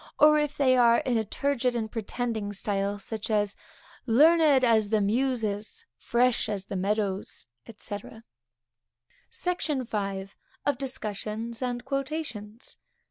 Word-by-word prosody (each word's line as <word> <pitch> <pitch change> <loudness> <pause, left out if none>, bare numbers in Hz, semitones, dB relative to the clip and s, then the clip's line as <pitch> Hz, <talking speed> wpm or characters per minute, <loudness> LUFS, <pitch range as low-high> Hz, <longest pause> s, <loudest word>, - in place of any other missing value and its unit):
or, 300 0 +7
if 295 -1 -2
they 260 -2 +4
are 235 -2 +6
in 250 - 0
a 225 - +2
turgid 255 +2 -1
and 220 -2 -2
pretending 225 -2 -3
style, 200 0 -1
such 215 +2 -4
as, 205 -2 +1 0.5
learned 295 +2 +5
as 220 -4 +4
the 215 0 +3
Muses, 225 - -1
fresh 240 -1 +2
as 200 -2 -3
the 195 - -6
meadows, 200 0 -2 0.3
&c. 205 -1 -3 1.3
SECTION 320 -7 -1
V. 195 -4 -3 0.4
_Of 285 -3 +1
Discussions 225 -2 -4
and 245 -1 -3
Quotations. 270 -6 -5
230 Hz, 125 wpm, -27 LUFS, 205-265 Hz, 1.3 s, or